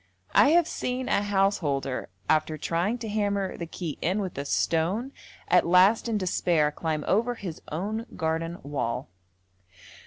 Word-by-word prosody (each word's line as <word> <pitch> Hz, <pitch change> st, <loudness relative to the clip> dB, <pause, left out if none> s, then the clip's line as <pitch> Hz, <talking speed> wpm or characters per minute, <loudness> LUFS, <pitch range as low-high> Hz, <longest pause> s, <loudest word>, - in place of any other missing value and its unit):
I 285 Hz, -, +6 dB
have 335 Hz, +1 st, +4 dB
seen 255 Hz, +1 st, -3 dB
a -, -, +2 dB
householder 190 Hz, -, 0 dB, 0.2 s
after 155 Hz, 0 st, +2 dB
trying 170 Hz, -, -1 dB
to 230 Hz, -, -6 dB
hammer 200 Hz, -2 st, -1 dB
the 170 Hz, -, -6 dB
key 165 Hz, -2 st, -5 dB
in 185 Hz, +5 st, +1 dB
with 190 Hz, -3 st, -3 dB
a 140 Hz, -, -3 dB
stone, 180 Hz, -, 0 dB, 0.4 s
at -, -, +4 dB
last 190 Hz, +7 st, +5 dB
in 220 Hz, -, +1 dB
despair 170 Hz, -5 st, +1 dB
climb 155 Hz, -1 st, -3 dB
over 235 Hz, +5 st, +2 dB
his 180 Hz, -8 st, -7 dB
own 215 Hz, +9 st, -3 dB
garden 165 Hz, +1 st, -2 dB
wall. 130 Hz, -3 st, -3 dB
180 Hz, 150 wpm, -27 LUFS, 160-210 Hz, 0.4 s, I